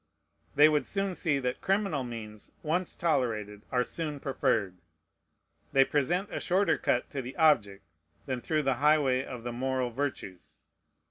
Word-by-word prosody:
They 145 Hz, +2 st, +8 dB
would 150 Hz, -1 st, +1 dB
soon 195 Hz, -1 st, -1 dB
see 160 Hz, -5 st, 0 dB
that 125 Hz, -2 st, -3 dB
criminal 195 Hz, -8 st, 0 dB
means, 110 Hz, -3 st, -8 dB
once 175 Hz, +4 st, -1 dB
tolerated, 110 Hz, -10 st, -1 dB
are 125 Hz, -1 st, +2 dB
soon 150 Hz, 0 st, -4 dB
preferred. 105 Hz, -9 st, 0 dB, 0.9 s
They 135 Hz, 0 st, +6 dB
present 175 Hz, +9 st, 0 dB
a -, -, -2 dB
shorter 190 Hz, +3 st, +2 dB
cut -, -, +1 dB
to 140 Hz, -, -3 dB
the 125 Hz, +1 st, -8 dB
object 115 Hz, -, +3 dB, 0.4 s
than 130 Hz, -3 st, -3 dB
through 155 Hz, +2 st, 0 dB
the 135 Hz, -2 st, +1 dB
highway 145 Hz, -4 st, +3 dB
of 125 Hz, -3 st, -8 dB
the 120 Hz, 0 st, -4 dB
moral 130 Hz, 0 st, -1 dB
virtues. 120 Hz, -8 st, -5 dB
135 Hz, 150 wpm, -29 LUFS, 120-155 Hz, 0.9 s, They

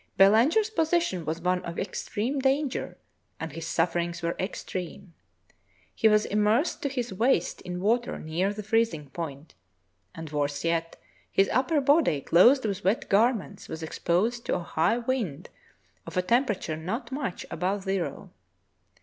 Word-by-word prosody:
Belanger's 250 Hz, -, +5 dB
position 320 Hz, -, 0 dB
was 160 Hz, +2 st, -3 dB
one 180 Hz, +1 st, 0 dB
of 170 Hz, 0 st, -6 dB
extreme 225 Hz, +7 st, -2 dB
danger 270 Hz, +1 st, 0 dB, 0.4 s
and 165 Hz, -1 st, -5 dB
his 165 Hz, +2 st, -6 dB
sufferings 170 Hz, 0 st, -1 dB
were 170 Hz, 0 st, -1 dB
extreme. 185 Hz, -1 st, -5 dB, 0.8 s
He 225 Hz, -, +3 dB
v/as 215 Hz, -1 st, +4 dB
immersed 210 Hz, -, +1 dB
to 280 Hz, -, -1 dB
his 245 Hz, -5 st, -3 dB
waist 225 Hz, -3 st, +1 dB
in 180 Hz, -1 st, -5 dB
water 230 Hz, +5 st, +1 dB
near 170 Hz, +5 st, -1 dB
the 210 Hz, +1 st, -6 dB
freezing 210 Hz, -10 st, 0 dB
point, 150 Hz, -2 st, -6 dB, 0.6 s
and, 165 Hz, 0 st, -7 dB
worse 145 Hz, -1 st, -1 dB
yet, 165 Hz, 0 st, -1 dB, 0.3 s
his 195 Hz, -, +3 dB
upper 270 Hz, +5 st, +2 dB
body, 280 Hz, -, +3 dB
clothed 240 Hz, -, +5 dB
with 200 Hz, -1 st, -2 dB
wet 195 Hz, +5 st, 0 dB
garments, 210 Hz, -, +1 dB
was 160 Hz, 0 st, -6 dB
exposed 210 Hz, +9 st, 0 dB
to -, -, +1 dB
a 175 Hz, -, -3 dB
high 170 Hz, +8 st, +1 dB
wind 230 Hz, -, -3 dB, 0.6 s
of -, -, -6 dB
a 180 Hz, -, +2 dB
temperature 215 Hz, -, +1 dB
not 225 Hz, -, -4 dB
much 265 Hz, -9 st, -4 dB
above 190 Hz, +2 st, -1 dB
zero. 190 Hz, -2 st, -3 dB
195 Hz, 150 wpm, -27 LUFS, 170-240 Hz, 0.8 s, Belanger's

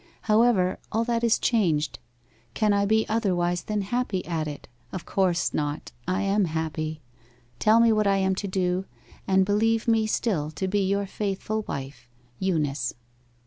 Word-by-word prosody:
However, 215 Hz, -4 st, +3 dB
all 225 Hz, +1 st, +1 dB
that 235 Hz, 0 st, -1 dB
is 230 Hz, -1 st, +4 dB
changed 165 Hz, -10 st, +1 dB, 0.6 s
can 210 Hz, -1 st, +2 dB
I 200 Hz, 0 st, +2 dB
be 220 Hz, +1 st, +2 dB
otherwise 175 Hz, -6 st, 0 dB
than 210 Hz, -1 st, -2 dB
happy 205 Hz, -2 st, -2 dB
at 160 Hz, -3 st, -2 dB
it? 145 Hz, -1 st, -7 dB, 0.2 s
Of 185 Hz, -, -6 dB
course 180 Hz, -3 st, +1 dB
not. 150 Hz, 0 st, -3 dB, 0.2 s
I 185 Hz, +2 st, 0 dB
am 200 Hz, 0 st, +2 dB
happy. 155 Hz, -1 st, -3 dB, 0.6 s
Tell 220 Hz, +2 st, +5 dB
me 230 Hz, -1 st, +5 dB
what 215 Hz, -1 st, +2 dB
I 195 Hz, 0 st, +3 dB
am 190 Hz, 0 st, +2 dB
to 200 Hz, +2 st, -3 dB
do, 185 Hz, 0 st, 0 dB, 0.4 s
and 190 Hz, -1 st, +4 dB
believe 220 Hz, +3 st, +1 dB
me 225 Hz, -1 st, +3 dB
still 185 Hz, -9 st, 0 dB
to 190 Hz, -, -1 dB
be 205 Hz, +2 st, +1 dB
your 200 Hz, +1 st, +1 dB
faithful 205 Hz, +2 st, -3 dB
wife, 135 Hz, -2 st, -6 dB, 0.3 s
EUNICE. 150 Hz, -9 st, -1 dB
195 Hz, 160 wpm, -26 LUFS, 175-215 Hz, 0.6 s, Tell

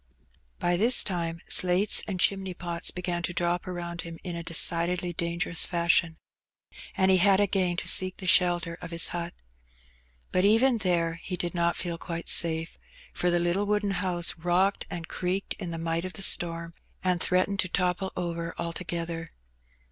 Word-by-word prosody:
By 175 Hz, 0 st, 0 dB
this 235 Hz, +6 st, +5 dB
time 170 Hz, -3 st, -3 dB
slates 185 Hz, +3 st, +3 dB
and 190 Hz, -3 st, -4 dB
chimney 190 Hz, -1 st, 0 dB
pots 170 Hz, -1 st, -1 dB
began 180 Hz, -1 st, -3 dB
to 175 Hz, 0 st, -3 dB
drop 175 Hz, +1 st, -1 dB
around 170 Hz, -1 st, -5 dB
him 165 Hz, -1 st, -9 dB
in 175 Hz, -2 st, -5 dB
a 170 Hz, -, -5 dB
decidedly 175 Hz, +2 st, +2 dB
dangerous 170 Hz, 0 st, -2 dB
fashion, 170 Hz, -1 st, +1 dB, 0.8 s
and 190 Hz, 0 st, +3 dB
he 190 Hz, -, +5 dB
had 195 Hz, +1 st, +4 dB
again 185 Hz, -3 st, +1 dB
to -, -, -4 dB
seek 185 Hz, -1 st, +5 dB
the 190 Hz, -, -8 dB
shelter 175 Hz, -2 st, +3 dB
of 175 Hz, -, -7 dB
his 170 Hz, 0 st, +3 dB
hut. 170 Hz, 0 st, -5 dB, 1.0 s
But 185 Hz, -, +1 dB
even 225 Hz, +4 st, +4 dB
there 170 Hz, -3 st, 0 dB
he 180 Hz, -, -5 dB
did 175 Hz, -1 st, -3 dB
not 170 Hz, -1 st, 0 dB
feel 170 Hz, -2 st, -3 dB
quite 170 Hz, -2 st, -4 dB
safe, 165 Hz, 0 st, +1 dB, 0.3 s
for 180 Hz, -, 0 dB
the 175 Hz, -, +2 dB
little 175 Hz, +4 st, 0 dB
wooden 205 Hz, -1 st, 0 dB
house 180 Hz, -2 st, 0 dB
rocked 180 Hz, +4 st, 0 dB
and 165 Hz, -2 st, -6 dB
creaked 185 Hz, +2 st, -3 dB
in 175 Hz, -, -5 dB
the 165 Hz, -, -5 dB
might 165 Hz, 0 st, -2 dB
of 185 Hz, 0 st, -6 dB
the 195 Hz, -, -6 dB
storm, 170 Hz, -2 st, +1 dB, 0.3 s
and 180 Hz, -2 st, 0 dB
threatened 185 Hz, +2 st, +1 dB
to 185 Hz, -, +1 dB
topple 180 Hz, +1 st, -1 dB
over 170 Hz, -1 st, -4 dB
altogether. 170 Hz, -1 st, -4 dB
175 Hz, 170 wpm, -27 LUFS, 170-185 Hz, 1.0 s, this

